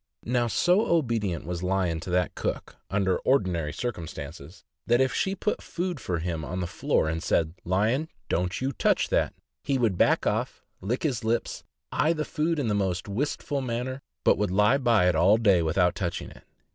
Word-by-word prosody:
Now, 120 0 +1
so 180 - +3
obedient 115 - 0
was 85 0 -4
Lion 90 -3 0
to 90 - -7
that 90 0 +1
cook, - - -4
under 95 -2 +1
ordinary 90 - +1
circumstances, 80 - -6 0.2
that 120 +1 +4
if 130 0 +2
she 190 0 0
put 210 +2 -1
food 175 -3 -3
for 90 -6 -2
him 85 -1 -3
on 90 +6 -4
the 90 - -1
floor 85 - 0
and 80 +1 -2
said, 80 -1 +1
"Lion, 110 - +1 0.2
don't 90 +2 -1
you 130 +1 -1
touch - - +1
that," - - +1 0.3
he 140 - +1
would 110 -8 +1
back - - +3
off, - - -1 0.2
lick 115 +7 -2
his 130 -7 -1
lips, 115 +1 -1 0.3
eye 160 +3 +2
the 155 -2 -2
food 160 +2 -1
in 140 -5 -1
the 105 - +1
most 95 -2 -1
wistful 140 +5 -2
manner, 130 +2 -3 0.2
but - - +4
would 105 - +1
lie 105 +8 +3
by 115 -8 +4
it 90 - +4
all 95 +7 +5
day 100 -6 +4
without 90 +2 +2
touching 85 -4 -4
it. - - -16
105 Hz, 190 wpm, -27 LUFS, 90-130 Hz, 0.3 s, all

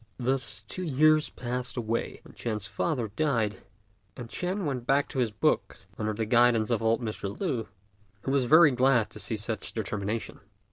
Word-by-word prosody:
Thus 120 -5 -1
two 185 - -5
years 155 -1 +3
passed 125 +1 -4
away, 115 -1 -2
when - - -15
Ch'ên's 110 -3 -3
father 115 +4 -1
died, 115 -4 0 0.6
and 120 -3 -7
Ch'ên 185 - -2
went 125 -4 -3
back 140 +1 +3
to 135 - -3
his 120 -3 +2
books 105 -1 -1
under 110 0 -2
the 110 +1 -1
guidance 120 0 +4
of 115 - +1
old 115 +2 +1
Mr. 105 -3 -4
Lü, 135 - -1 0.6
who 135 - -1
was 135 -2 +2
very 155 +3 +7
glad 125 -2 +3
to 105 - -8
see 110 +2 -2
such 110 -1 -4
determination. 105 0 -3
120 Hz, 175 wpm, -28 LUFS, 110-135 Hz, 0.6 s, very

